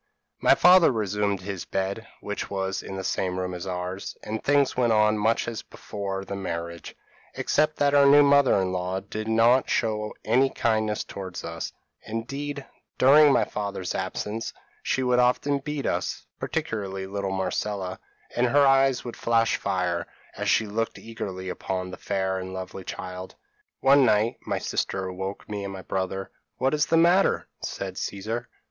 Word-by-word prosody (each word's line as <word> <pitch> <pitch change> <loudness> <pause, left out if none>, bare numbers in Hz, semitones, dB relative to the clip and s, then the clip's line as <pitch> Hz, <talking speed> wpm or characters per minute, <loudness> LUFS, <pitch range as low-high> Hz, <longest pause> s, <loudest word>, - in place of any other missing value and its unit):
p> - - -3
"My - - +8
father 180 -2 +7
resumed 105 -3 -1
his 95 -1 -5
bed, 100 +4 -3
which 105 0 -4
was 95 -1 -2
in 95 - -7
the 95 - -4
same 90 0 -1
room 90 0 -3
as 90 +1 -6
ours; 90 +1 -4
and 110 +1 -4
things 145 -1 +3
went 120 -2 +2
on 105 0 +4
much 110 +2 +1
as 115 -2 -4
before 100 -2 -6
the 100 - -5
marriage, 85 -3 -5 0.4
except 155 0 +1
that 145 -1 +2
our 140 -1 +6
new 145 +1 +8
mother 140 -5 +5
in 95 -1 0
law 90 +1 -2
did 110 +3 -6
not 115 +3 +4
show 105 -2 0
any 130 +5 +4
kindness 110 -3 0
towards 95 -2 -7
us; 85 0 -5 0.3
indeed 140 +5 -5 0.3
during 145 +3 +7
my - - +3
father's 100 -3 -4
absence, 105 +4 -3 0.3
she 130 - 0
would 125 -1 +3
often 125 +3 +2
beat 145 0 -4
us, - - -2
particularly 95 -3 -3
little 100 0 -3
Marcella, 95 0 -2 0.4
and 125 +1 +3
her 140 +3 +5
eyes 135 -1 +4
would 120 - -6
flash 115 -1 +2
fire, 90 -2 -1 0.3
as - - -2
she 110 - +3
looked 110 +2 -2
eagerly 95 -5 -6
upon 95 0 -3
the - - -7
fair 95 -1 -1
and 95 0 -6
lovely 95 0 -6
child. 90 0 -7 0.5
"One 140 +1 +6
night, 115 +1 +3
my - - 0
sister 95 -1 -2
awoke 95 +2 -5
me 105 -1 -4
and 100 - -4
my 95 -1 -8
brother. 95 0 -3 0.3
"'What 135 +2 +1
is 150 0 +2
the 165 - +3
matter?' 175 +4 +4
said - - -5
Caesar. 110 +4 -4
105 Hz, 170 wpm, -26 LUFS, 95-125 Hz, 0.5 s, My